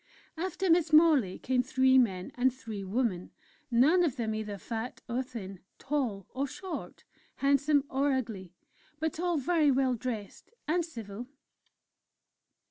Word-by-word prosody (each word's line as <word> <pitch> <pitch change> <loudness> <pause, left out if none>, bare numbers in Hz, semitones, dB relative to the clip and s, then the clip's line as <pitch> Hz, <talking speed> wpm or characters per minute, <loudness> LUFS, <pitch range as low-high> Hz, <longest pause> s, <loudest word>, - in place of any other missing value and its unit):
After 375 +3 -2
Miss 330 -2 +3
Morley 305 - +5
came 255 -1 +1
three 260 0 +4
men 190 -7 0
and 255 +1 +2
three 225 -5 -7
women, 195 -3 -1 0.4
none 285 +10 +5
of 295 -7 +1
them 225 -4 -2
either 215 -2 -4
fat 225 +4 -5
or 245 +1 -1
thin, 205 -7 -8 0.2
tall 255 -9 -2
or 275 +2 -1
short, 370 +7 -7 0.3
handsome 280 +1 +3
or 280 +1 +1
ugly 220 -9 -3 0.5
but 320 0 -2
all 350 -1 +1
very 305 +1 +2
well 265 -1 +2
dressed 235 -4 -5 0.2
and 345 +3 +2
civil. 230 -7 -8
260 Hz, 135 wpm, -30 LUFS, 220-300 Hz, 0.5 s, Morley